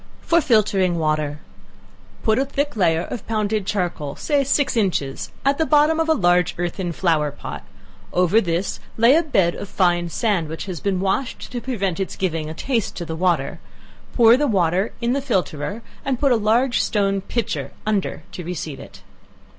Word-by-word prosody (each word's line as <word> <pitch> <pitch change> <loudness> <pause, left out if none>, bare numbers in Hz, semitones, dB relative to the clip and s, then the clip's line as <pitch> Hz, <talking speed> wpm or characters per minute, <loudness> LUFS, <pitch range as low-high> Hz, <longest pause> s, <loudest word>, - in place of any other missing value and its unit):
For 335 0 +3
Filtering 195 - +2
Water. 155 -2 -1 0.8
Put 220 +1 +3
a 270 - +2
thick 285 0 -2
layer 170 -5 +2
of 230 +2 -7
pounded 215 -2 -1
charcoal, 175 -8 -2
(say 290 -2 +1
six 280 0 +1
inches,) 175 - -1 0.2
at 275 +2 +2
the 320 - +3
bottom 305 +2 +4
of 325 0 +1
a 320 - +5
large 175 - +2
earthen 175 +1 -2
flower 160 -3 +1
pot; 145 - -7 0.5
over 180 +5 +3
this, 175 0 -2 0.2
lay 235 +5 +6
a 330 - +5
bed 195 - +2
of 200 - -7
fine 175 -2 +1
sand, 180 -1 0
which 160 - -5
has 185 -5 -5
been 195 -2 -1
washed, 215 +7 -2
(to 245 -1 -4
prevent 200 -9 -2
its 195 - -3
giving 165 -4 -2
a 160 - -6
taste 235 +2 -1
to 170 - -5
the 160 - -4
water;) 175 +1 0 0.6
pour 230 -1 +7
the 295 +1 +1
water 190 -2 +1
in 235 +1 +1
the 280 - 0
filterer 190 - -2 0.2
and 265 -3 -1
put 280 -2 +3
a - - +5
large 230 +2 +2
stone 195 -2 +1
pitcher 230 +2 -3
under 210 -3 -1
to 180 - -7
receive 160 -4 -5
it. - - -13
195 Hz, 180 wpm, -22 LUFS, 175-240 Hz, 0.8 s, pour